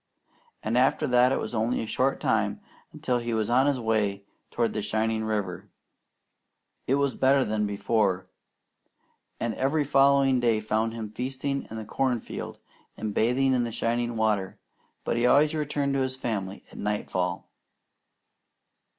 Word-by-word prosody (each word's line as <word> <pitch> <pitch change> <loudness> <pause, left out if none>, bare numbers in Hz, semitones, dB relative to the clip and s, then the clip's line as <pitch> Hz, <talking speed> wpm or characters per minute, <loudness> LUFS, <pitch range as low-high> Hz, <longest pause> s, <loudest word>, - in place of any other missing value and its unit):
and 115 +3 +1
after 130 +1 +2
that 125 +1 +4
it - - +1
was - - -4
only 115 +2 0
a - - -2
short 130 +5 0
time - - 0 0.3
until 125 -1 -1
he 120 -1 -2
was 110 +1 0
on 130 +3 +4
his 140 -3 +1
way 105 -3 0 0.2
toward 115 -1 0
the 105 - -2
shining 110 +1 -1
river. 100 -5 -3 1.2
It 135 - +3
was 140 -1 0
better 135 0 +3
than 105 0 0
before, 100 -2 0 1.1
and 115 -1 -1
every 140 +5 +1
following 135 -1 +4
day 115 -3 +2
found 110 +1 -1
him 110 -2 -6
feasting 135 +4 -3
in 110 - -6
the 110 - -6
corn 125 +2 0
field - - -7 0.4
and 110 -1 -3
bathing 130 +5 +2
in 125 -1 +2
the 120 - -3
shining 120 +1 -1
water; 105 -4 0 0.5
but - - -1
he 120 +1 +3
always 150 +4 +4
returned 145 -2 -1
to 135 - +1
his 130 0 -1
family 100 -6 -4
at - - -11
nightfall. 95 -4 -2
115 Hz, 160 wpm, -27 LUFS, 110-130 Hz, 1.2 s, that